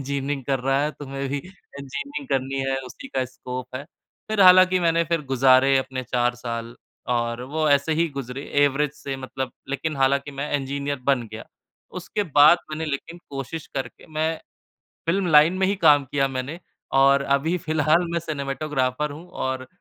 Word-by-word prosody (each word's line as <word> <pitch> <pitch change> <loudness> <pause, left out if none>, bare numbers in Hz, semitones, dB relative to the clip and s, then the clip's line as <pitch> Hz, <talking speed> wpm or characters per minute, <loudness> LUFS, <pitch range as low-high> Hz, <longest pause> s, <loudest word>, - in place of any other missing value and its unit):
Engineering 140 0 -3
कर 135 -1 0
रहा 135 +2 +1
है 150 - 0
तुम्हें 135 -1 -4
भी 145 +1 -2
इंजीनियरिंग 145 -4 -8
करनी 135 0 -1
है, 135 - 0
उसी 275 - -10
का 130 - -1
स्कोप 125 0 -8
है। 140 - -7 0.5
फिर 215 - 0
हालाँकि 185 0 +7
मैंने 170 0 +2
फिर 165 -1 -1
गुज़ारे 135 +1 +5
अपने 130 -1 -3
4 120 0 0
साल 115 -1 -5 0.4
और 120 +1 -2
वो 155 -1 +2
ऐसे 140 +3 +3
ही 170 - +2
गुज़रे 135 +1 -5 0.2
एवरेज 145 +1 +1
से 140 -2 -6
मतलब 130 0 -5 0.2
लेकिन 150 +2 -3
हालाँकि 140 +1 +1
मैं 145 +1 -3
इंजीनियर 140 0 -3
बन 135 -2 +2
गया। 110 - -7 0.6
उसके 205 +4 -2 0.2
बाद 155 +4 +8
मैंने 155 +1 -3
लेकिन 150 +4 -5
कोशिश 140 +3 -6
करके 130 -3 -5
मैं 160 +1 0 0.7
फ़िल्म 185 +2 +1
लाइन 150 +3 +7
में 190 - +2
ही 200 - +1
काम 150 -6 +5
किया 135 -1 +2
मैंने 135 +5 -5 0.4
और 140 +1 +5
अभी 160 +6 0
फिलहाल 155 +2 +2
मैं 170 - 0
सिनेमेटोग्राफर 145 -2 -2
हूँ 160 +5 -10 0.2
और 130 -1 -3
140 Hz, 170 wpm, -24 LUFS, 130-155 Hz, 0.7 s, बाद